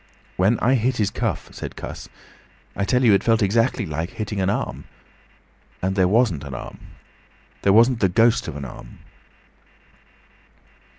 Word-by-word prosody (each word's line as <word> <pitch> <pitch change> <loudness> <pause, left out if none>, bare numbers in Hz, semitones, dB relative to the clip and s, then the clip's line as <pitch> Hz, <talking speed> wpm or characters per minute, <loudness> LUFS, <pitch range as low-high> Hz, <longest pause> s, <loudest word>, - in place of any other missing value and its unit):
"When 100 +6 +2
I 125 +4 +3
hit 125 0 +1
his 105 -2 0
cuff," - - -3
said - - -7
Cuss, - - -8 0.7
"I 100 - -1
tell 125 +4 +1
you, 115 -4 +6
it 100 - +3
felt 115 -2 +3
exactly 115 +3 +1
like 80 +2 -4
hitting 105 -1 -4
an 95 - +1
arm. 105 - -3 0.9
And 95 +1 -1
there 95 -2 +3
wasn't 100 - +2
an 70 -2 -7
arm! 65 - -8 0.8
There 100 - +3
wasn't 115 +3 +5
the 95 - +2
ghost 115 +5 +3
of 80 - -6
an 70 -1 -6
arm!" - - -11
100 Hz, 160 wpm, -22 LUFS, 90-115 Hz, 0.9 s, you